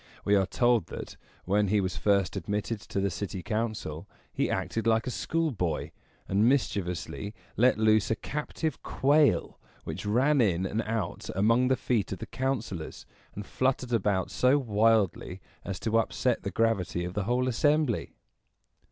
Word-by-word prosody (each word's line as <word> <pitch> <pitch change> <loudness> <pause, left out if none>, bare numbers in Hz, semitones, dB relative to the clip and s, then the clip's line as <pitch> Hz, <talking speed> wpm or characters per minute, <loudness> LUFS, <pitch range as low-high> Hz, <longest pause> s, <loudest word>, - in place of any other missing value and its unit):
We 100 - +3
are 95 -2 +3
told, 120 -5 +2
that, - - -7 0.3
when 100 +2 +2
he 105 +2 +2
was 95 -3 -1
first 100 +3 +1
admitted 105 +4 -2
to - - -4
the 100 0 0
city 90 0 -5
council, 110 -8 -3 0.2
he - - 0
acted 115 0 -2
like 110 0 +3
a 125 - -2
schoolboy, 120 - -1 0.4
and 105 +5 +3
mischievously 100 - -2 0.2
let 125 +1 +4
loose 110 -1 +3
a 115 - +2
captive 150 +2 -4
quail, 145 +2 +2 0.2
which - - -5
ran 130 +6 +3
in 95 -4 +1
and 105 +4 -1
out 110 -5 -3
among 115 +6 +3
the 130 0 +2
feet 110 -6 -1
of 95 - -3
the - - -6
councilors, 115 -11 -4 0.3
and 105 - -6
fluttered 130 0 -1
about 95 -4 +1
so 125 +7 +3
wildly 110 - +1 0.2
as 95 -2 -5
to 115 0 +2
upset 120 +2 0
the 100 - -3
gravity 100 -6 0
of 90 - -5
the 105 -1 -2
whole 125 +3 +1
assembly. 145 0 +1
110 Hz, 160 wpm, -28 LUFS, 95-125 Hz, 0.4 s, let